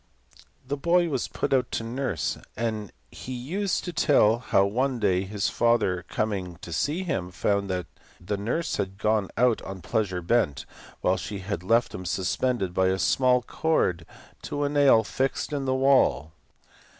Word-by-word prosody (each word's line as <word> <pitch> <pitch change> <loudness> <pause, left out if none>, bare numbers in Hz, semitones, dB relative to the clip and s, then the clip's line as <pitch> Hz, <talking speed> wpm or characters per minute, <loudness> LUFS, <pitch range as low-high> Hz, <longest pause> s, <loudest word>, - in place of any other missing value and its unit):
The 145 +2 -2
boy 170 +3 +2
was 135 -5 -1
put - - -2
out 125 -2 +1
to - - -1
nurse, 115 - -2 0.2
and 110 -3 -2 0.2
he 130 - -7
used 180 +11 -2
to 175 - -4
tell 115 -8 +4
how 100 -5 +2
one 125 +6 0
day 95 -4 +1
his 100 0 -2
father 115 -6 +1
coming 100 -5 -2
to 85 - -6
see 150 - -1
him 95 - -2
found 100 +2 0
that 90 -2 -2 0.3
the 90 +4 -3
nurse 120 - -2
had 95 0 -3
gone 105 -1 +1
out 120 -1 +3
on 95 -2 -8
pleasure 95 -3 -1
bent, 85 -8 +1 0.4
while - - +2
she 105 - -5
had 100 -1 -4
left 115 +6 +2
him 90 - -6
suspended 95 +2 -1
by 95 0 +2
a 95 0 +1
small 125 +5 +3
cord 90 - 0 0.3
to 145 - -3
a 145 - +1
nail 140 -6 +5
fixed 135 +7 -2
in 140 -2 -2
the 130 0 +1
wall. 130 - +3
110 Hz, 170 wpm, -26 LUFS, 95-130 Hz, 0.4 s, nail